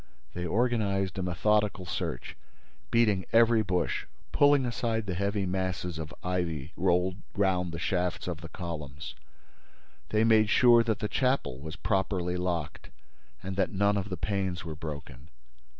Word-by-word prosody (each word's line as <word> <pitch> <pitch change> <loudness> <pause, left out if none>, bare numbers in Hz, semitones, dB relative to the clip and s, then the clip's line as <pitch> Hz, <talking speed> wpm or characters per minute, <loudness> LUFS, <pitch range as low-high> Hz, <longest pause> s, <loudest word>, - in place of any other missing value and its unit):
They 90 0 -3
organized 100 -4 0
a - - 0
methodical 100 +2 +1
search, 85 - -4 0.5
beating 105 -5 +3
every 115 0 +5
bush, 90 -3 -1 0.2
pulling 145 -2 +5
aside 115 -2 -1
the 95 - -2
heavy 100 +2 -1
masses 90 -2 -2
of 80 -1 -5
ivy 85 -6 -2
rolled 90 +1 +1 0.2
round 95 -4 +1
the 85 - -5
shafts 90 +1 -1
of 85 -2 -4
the 80 - -8
columns. 75 -5 -6 1.0
They 110 +1 +2
made 110 -2 +5
sure 120 0 +6
that 110 -3 -1
the 105 - 0
chapel 125 - 0
was 80 +3 -7
properly 95 -3 0
locked 90 -7 -3 0.5
and 95 +1 -4
that 95 - +1
none 100 +1 +2
of 100 0 -2
the 95 - -3
panes 95 -1 -2
were 80 - -4
broken. 75 -2 -8
95 Hz, 150 wpm, -29 LUFS, 85-105 Hz, 1.0 s, sure